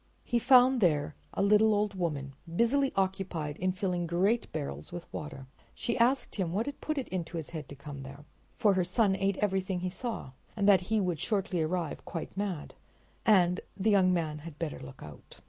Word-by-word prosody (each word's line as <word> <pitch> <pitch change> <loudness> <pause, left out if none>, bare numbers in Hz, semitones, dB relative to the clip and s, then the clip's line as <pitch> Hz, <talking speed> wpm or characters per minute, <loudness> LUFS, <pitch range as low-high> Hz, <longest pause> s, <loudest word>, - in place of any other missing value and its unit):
He 240 - +1
found 255 0 +6
there 155 -4 +2 0.2
a - - +1
little 210 +1 +5
old 205 0 0
woman 150 -7 -3 0.2
busily 270 +6 +3
occupied 185 -6 -1
in 185 +1 +1
filling 180 -2 -1
great 195 +8 +1
barrels 70 +1 -5
with 175 -1 -6
water. 150 -3 -6 0.3
She 235 - -2
asked 250 +3 +2
him 180 -4 -1
what 215 +5 0
had 285 0 -6
put 310 -1 -2
it 270 - -2
into 175 -2 -3
his 160 - -5
head 155 -4 -6
to 140 - -8
come 140 0 -8
there, 140 +2 -10 0.3
for 210 -4 +4
her 185 -1 +2
son 195 +2 +2
ate 195 0 0
everything 190 -2 0
he 185 - -1
saw, 220 - -5 0.2
and 205 -2 +1
that 195 -2 +7
he 220 -1 +3
would 180 -5 0
shortly 195 -3 0
arrive 165 0 -2
quite 165 - -6
mad, 195 -6 -3 0.5
and 180 -4 +5
that - - -14
the 210 +2 +2
young 190 -2 +5
man 160 -4 -1
had 155 -1 -10
better 160 -2 -4
look 130 0 -10
out. 75 -1 -12
185 Hz, 200 wpm, -30 LUFS, 160-210 Hz, 0.5 s, that